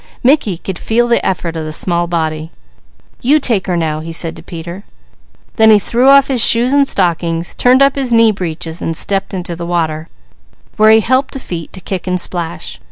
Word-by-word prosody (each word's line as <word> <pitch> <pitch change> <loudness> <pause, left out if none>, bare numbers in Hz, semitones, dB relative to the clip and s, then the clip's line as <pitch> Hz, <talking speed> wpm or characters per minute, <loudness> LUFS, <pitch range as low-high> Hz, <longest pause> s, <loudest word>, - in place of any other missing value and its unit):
Mickey 245 - +2
could 185 +1 -6
feel 240 +2 +1
the 235 - +1
effort 175 -3 -2
of 160 - -4
the 155 - -5
small 175 +2 0
body. 160 -2 -3 0.7
"You 290 +5 +3
take 225 -9 -1
her 180 -2 0
now," 155 -2 -2
he 165 +1 -7
said 165 0 -1
to - - -10
Peter. 170 +3 -8 0.7
Then 220 -1 +5
he 215 - +7
threw 240 +6 +1
off 275 0 +6
his 255 -4 +2
shoes 240 +4 +3
and 285 -1 +3
stockings, 170 -3 -1
turned 255 +2 +4
up 275 0 +3
his 265 -3 -3
knee 230 -1 +5
breeches 170 -3 -5
and 165 -1 -2
stepped 195 +1 -1
into 180 -2 -5
the 170 - -7
water, 160 -2 -2 0.7
where 215 0 +4
he 220 0 +6
helped 260 +4 0
the - - -4
feet 170 - -7
to 185 - -9
kick 185 0 -5
and 180 0 0
splash. 170 -1 -5
185 Hz, 205 wpm, -14 LUFS, 165-235 Hz, 0.7 s, he